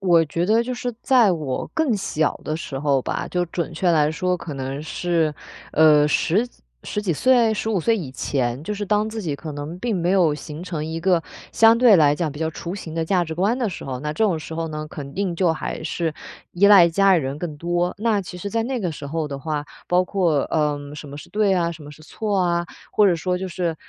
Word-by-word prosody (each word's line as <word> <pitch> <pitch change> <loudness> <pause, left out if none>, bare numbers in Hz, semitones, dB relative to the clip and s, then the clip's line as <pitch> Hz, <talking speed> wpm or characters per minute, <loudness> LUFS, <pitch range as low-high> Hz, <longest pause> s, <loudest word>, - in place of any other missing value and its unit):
我 175 -4 +4
觉 170 +4 -1
得 220 +4 +3
就 250 +1 -4
是 245 0 -3
在 240 -8 +4
我 150 -6 -3
更 285 -9 +1
小 155 -5 -1
的 155 - -2
时 135 -4 -5
候 140 -2 +2
吧， - - -3
就 180 0 0
准 170 0 -4
确 175 +2 +1
来 150 -2 +3
说， 180 +2 0
可 165 -3 -7
能 135 +2 -4
是， 165 -2 0 0.4
呃， 150 -1 +6
10 190 +9 +1 0.4
10 210 - -3
几 205 -4 -2
岁， 235 - +3
15 210 -3 -1
岁 230 +5 +2
以 145 -10 -6
前， 130 -1 -2
就 210 +6 -3
是 205 0 -3
当 210 +2 +1
自 220 -1 -5
己 150 -5 -2
可 155 +2 -7
能 145 +5 -6
并 225 -1 -1
没 175 +1 0
有 175 -6 +3
形 150 +2 -8
成 165 -4 -4
一 160 +1 -4
个 175 -1 +2 0.3
相 225 0 +6
对 235 -6 +7
来 145 -2 +5
讲 155 -1 -2
比 145 - -9
较 160 0 -1
雏 170 +3 -6
形 165 -5 -7
的 165 - 0
价 180 0 +1
值 160 0 -5
观 205 +9 +1
的 240 - 0
时 - - -7
候， 130 -2 -4
那 150 +1 -3
这 220 - -2
种 185 -7 +2
时 160 +1 -8
候 165 0 -3
呢， 155 0 -5
肯 140 -2 -8
定 190 -3 -1
就 170 -2 +2
还 160 - -5
是 160 0 -2 0.4
依 195 +3 +4
赖 195 -4 +8
家 195 +2 +4
里 160 - 0
人 135 +2 -4
更 155 -3 -5
多。 175 +2 -1
那 215 -2 +1
其 180 -1 -8
实 200 - -4
在 225 +2 0
那 255 0 -2
个 180 -6 -2
时 145 -1 -8
候 155 +1 -2
的 140 -1 -5
话， 150 +1 -3 0.2
包 180 +1 +3
括， 170 -8 +1
嗯， 145 -2 -1
什 145 -1 -9
么 140 - -8
是 - - -10
对 210 0 +2
呀， 170 -3 +1
什 155 -2 -12
么 145 - -10
是 155 +1 -14
错 205 +4 -2
啊， 175 -1 +1 0.3
或 210 - +5
者 175 -3 +3
说 180 +2 -1
就 190 0 -4
是 170 -2 -2
170 Hz, 255 characters per minute, -22 LUFS, 150-195 Hz, 0.4 s, 赖